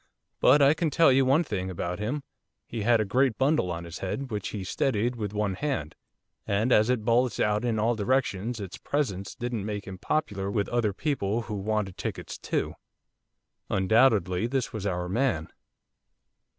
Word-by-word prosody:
But 145 - +6
I 140 +2 +6
can 160 0 0
tell 160 -1 +5
you 135 +1 +4
one 140 +6 +4
thing 95 - -3
about 90 0 -4
him, 125 +8 -2 0.4
he 115 - -5
had 115 +2 +4
a 110 - +1
great 125 +3 +2
bundle 135 - +2
on 85 0 -4
his 85 0 -8
head, 130 +8 -4
which 105 -2 -3
he 100 -3 -5
steadied 120 +4 0
with 105 -4 -4
one 105 -2 -1
hand, 95 - -2 0.5
and 105 +5 +1
as 110 +1 +5
it 120 -4 0
bulged 120 0 +2
out 105 +1 +1
in 115 -2 0
all 115 +3 +2
directions 115 -1 0
its 100 -2 -7
presence 100 -10 -2
didn't 120 -4 -3
make 105 -1 -4
him 95 -1 -8
popular 100 -10 -1
with 100 0 0
other 120 -3 +1
people 115 -2 -1
who 110 - -6
wanted 100 -1 -2
tickets - - -5
too.' - - -2 1.0
Undoubtedly 100 -1 +3
this 130 -1 -2
was 105 -2 -3
our 90 -2 -2
man. 105 - 0
110 Hz, 175 wpm, -27 LUFS, 95-125 Hz, 1.0 s, But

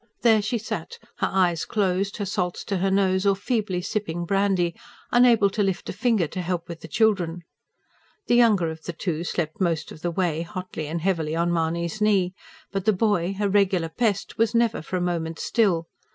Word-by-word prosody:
There 225 -3 +5
she 235 +4 -1
sat, 235 - -5 0.2
her - - 0
eyes 175 -3 +2
closed, 195 -1 0
her 205 - -2
salts 180 -2 -2
to 200 - -2
her 195 +2 +1
nose 190 -1 +2
or 200 -1 +3
feebly 200 -3 -1
sipping 175 -5 -2
brandy, 195 -2 +1 0.4
unable 240 -5 +5
to 210 - -1
lift 195 -2 -1
a - - -8
finger 215 -2 +2
to 185 +4 -5
help 175 -1 -3
with 170 -1 -7
the - - -8
children. 180 -3 +1 0.8
The - - +1
younger 215 -9 +4
of 160 0 -9
the 170 - -4
two 170 -1 -3
slept 175 +2 -3
most 170 -4 0
of 155 - -11
the 175 - -1
way 170 -2 0
hotly 180 -3 -6
and 165 +2 -3
heavily 165 -4 0
on 170 +1 +1
Mahony's 170 +4 -1
knee; 195 -4 +3 0.4
but 195 -2 -3
the 215 - +4
boy, 195 -2 +1
a 205 - +2
regular 190 -4 +2
pest, 205 +3 -1
was 230 +1 +2
never 230 -1 +2
for 170 - -5
a - - -2
moment 165 -2 -2
still. 190 -8 +1
185 Hz, 195 wpm, -24 LUFS, 170-205 Hz, 0.8 s, There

